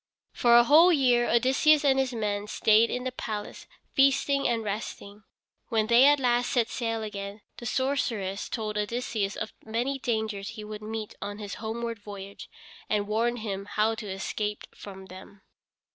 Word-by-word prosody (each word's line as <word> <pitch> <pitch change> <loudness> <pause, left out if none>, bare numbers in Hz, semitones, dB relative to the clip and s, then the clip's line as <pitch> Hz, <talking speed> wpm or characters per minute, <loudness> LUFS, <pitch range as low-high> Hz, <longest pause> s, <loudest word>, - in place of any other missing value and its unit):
For 235 -1 +5
a 240 - +7
whole 315 +8 +7
year 250 -6 +3
Odysseus 270 +6 +4
and 270 -1 +4
his 265 -1 0
men 210 -3 -2
stayed 220 +1 +4
in 250 - -3
the 255 - -2
palace, 215 -4 -6 0.3
feasting 275 +1 +3
and 230 -1 0
resting. 205 0 -6 0.4
When 220 -2 +1
they 235 +3 +6
at 290 0 +5
last 245 -1 +1
set 240 -3 +2
sail 225 -2 -2
again 200 0 -6 0.2
the 240 - -6
sorceress 235 -8 -1
told 215 -2 -3
Odysseus 210 -2 -2
of 220 - -5
many 240 +5 -2
dangers 220 -5 -2
he 215 - -8
would 210 0 -8
meet 215 0 -5
on 205 0 -5
his 205 -2 -7
homeward 230 0 -4
voyage, 200 -1 -9 0.4
and 205 -1 0
warned 230 +2 0
him 195 -1 -4
how 215 +2 +1
to 220 -1 -7
escape 205 +2 -3
from 190 -1 -10
them. 190 +1 -13
220 Hz, 165 wpm, -27 LUFS, 205-245 Hz, 0.4 s, a